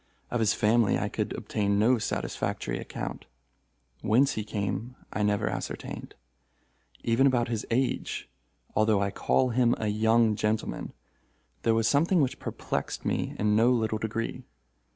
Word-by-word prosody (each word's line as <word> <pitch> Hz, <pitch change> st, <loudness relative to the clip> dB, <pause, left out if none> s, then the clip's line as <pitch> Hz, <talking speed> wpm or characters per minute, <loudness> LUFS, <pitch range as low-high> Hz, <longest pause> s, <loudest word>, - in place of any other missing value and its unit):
Of 120 Hz, -, 0 dB
his 110 Hz, -1 st, +3 dB
family 110 Hz, 0 st, +3 dB
I -, -, -1 dB
could -, -, -2 dB
obtain 100 Hz, -1 st, -1 dB
no 115 Hz, +4 st, +4 dB
satisfactory -, -, -2 dB
account. -, -, -6 dB, 0.8 s
Whence 130 Hz, +6 st, +4 dB
he 110 Hz, -, -3 dB
came, 105 Hz, +3 st, -3 dB, 0.2 s
I -, -, -1 dB
never 105 Hz, 0 st, +1 dB
ascertained. -, -, -5 dB, 0.9 s
Even 120 Hz, +4 st, +4 dB
about 120 Hz, -2 st, +2 dB
his 115 Hz, -3 st, -3 dB
age—although 110 Hz, -, -1 dB
I 100 Hz, 0 st, 0 dB
call 130 Hz, +5 st, +2 dB
him 120 Hz, 0 st, +3 dB
a 105 Hz, -, -1 dB
young 110 Hz, +1 st, +3 dB
gentleman—there 105 Hz, -, -3 dB
was 115 Hz, -1 st, +2 dB
something 165 Hz, -, +3 dB
which 135 Hz, -4 st, 0 dB
perplexed -, -, -4 dB
me -, -, -1 dB
in 105 Hz, 0 st, +2 dB
no 115 Hz, +3 st, +5 dB
little 110 Hz, -3 st, +1 dB
degree. 110 Hz, +1 st, -3 dB
110 Hz, 135 wpm, -28 LUFS, 105-120 Hz, 0.9 s, no